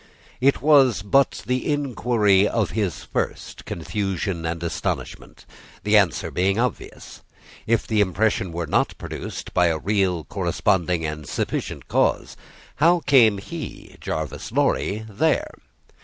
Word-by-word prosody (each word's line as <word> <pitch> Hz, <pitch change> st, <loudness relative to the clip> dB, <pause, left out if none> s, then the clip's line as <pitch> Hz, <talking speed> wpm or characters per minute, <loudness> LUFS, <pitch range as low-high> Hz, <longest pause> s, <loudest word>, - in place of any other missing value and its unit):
It 135 Hz, +2 st, +2 dB
was 135 Hz, -9 st, +5 dB
but 135 Hz, +7 st, +2 dB
the 125 Hz, +4 st, -1 dB
inquiry 115 Hz, -8 st, +2 dB
of 115 Hz, -3 st, -1 dB
his 105 Hz, -5 st, -2 dB
first -, -, -4 dB
confusion 95 Hz, -1 st, -3 dB
and 85 Hz, +1 st, -4 dB
astonishment, 85 Hz, -1 st, -4 dB, 0.4 s
the -, -, +2 dB
answer -, -, +2 dB
being 95 Hz, +3 st, +1 dB
obvious. 120 Hz, -1 st, -4 dB, 0.5 s
If 115 Hz, +1 st, +2 dB
the 110 Hz, -2 st, +1 dB
impression 95 Hz, -1 st, 0 dB
were 85 Hz, +1 st, -3 dB
not -, -, 0 dB
produced -, -, -7 dB
by 90 Hz, -, +4 dB
a 80 Hz, -1 st, +1 dB
real 95 Hz, -2 st, 0 dB
corresponding 90 Hz, -4 st, 0 dB
and 75 Hz, -2 st, -5 dB
sufficient -, -, -3 dB
cause, -, -, 0 dB, 0.4 s
how 170 Hz, +4 st, +4 dB
came 115 Hz, -9 st, +5 dB
he, 100 Hz, -, -8 dB
Jarvis 80 Hz, -3 st, -4 dB
Lorry, 110 Hz, +2 st, 0 dB
there? 150 Hz, +10 st, 0 dB
100 Hz, 125 wpm, -23 LUFS, 90-120 Hz, 0.5 s, was